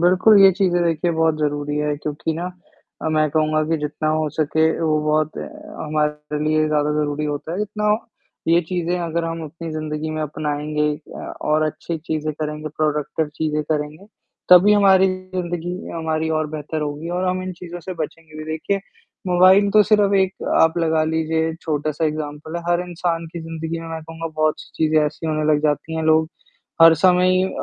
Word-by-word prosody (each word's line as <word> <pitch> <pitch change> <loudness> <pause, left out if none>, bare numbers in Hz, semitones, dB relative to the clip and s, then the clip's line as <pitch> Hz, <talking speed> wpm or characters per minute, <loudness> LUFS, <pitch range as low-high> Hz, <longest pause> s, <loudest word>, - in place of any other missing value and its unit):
बिल्कुल, 185 +5 +5
ये 195 - +9
चीज़ें 175 -2 +1
देखिए 165 +1 +1
बहुत 160 -1 +2
ज़रूरी 145 -1 -1
हैं 150 0 0
क्योंकि 150 +2 -2
ना 170 - -4 0.6
अ, - - 0
मैं 155 -1 +2
कहूँगा 155 0 +1
कि 165 - +2
जितना 150 +1 -2
हो 155 0 +1
सके 155 +1 +1 0.2
वो 155 -2 +2
बहुत 155 0 +1
हमारे 150 - -4
लिए 155 0 +2
ज़्यादा 150 0 +1
ज़रूरी 150 0 -1
होता 150 +2 -4
है, 195 +4 -1
इतना 210 0 -1 0.6
ये 170 +1 +5
चीज़ें 180 -1 -1
अगर 170 -1 -2
हम 165 0 -4
अपनी 165 +2 -7
ज़िंदगी 155 0 -4
में 155 0 -3
अपनाएँगे 150 0 -1 0.3
अ, - - -7 0.2
और 155 +1 +1
अच्छी 155 +2 -4
चीज़ें 155 -1 -3
करेंगे, 150 0 -4
प्रोडक्टिव 150 0 -1
चीज़ें 150 -1 -1
करेंगे, 150 +5 -4 0.4
तभी 180 +3 +8
हमारी 195 -2 +5 0.3
ज़िंदगी 175 0 -3 0.2
हमारी 160 -1 -2
और 155 - -1
बेहतर 155 0 -4
होगी 150 +2 -4
और 185 - 0
हम 185 0 -1
इन 185 0 -4
चीज़ों 175 0 -9
से 185 +3 -6
बचेंगे 155 -1 -7
भी। 155 - -6
देखिए 195 +5 -1 0.5
मोबाइल 185 +3 +5
तो 215 +1 +6
सिर्फ़ 205 -1 +3
एक 190 -1 +1 0.2
आप 160 +1 +4
लगा 160 -1 +2
लीजिए 160 0 0
छोटा-सा 155 0 -1
एक्ज़ाम्पल 155 +1 -5
है, 170 - -5
हर 175 0 +2
इंसान 170 -1 -2
की 170 - -5
ज़िंदगी 165 0 -5
में 165 - -8
मैं 160 0 -5
कहूँगा 165 +1 -7
बहुत 155 0 +2
सी - - -13
चीज़ें 155 -1 +3
ऐसी 155 +2 -5
होने 155 -1 -1
लग 150 - +2
जाती 155 +2 -1
हैं, 160 - -1
लोग 160 0 +3 0.5
हर 165 0 +9
समय 180 +2 +4
ही 185 0 +3
अ - - -1
160 Hz, 185 wpm, -21 LUFS, 155-175 Hz, 0.6 s, ये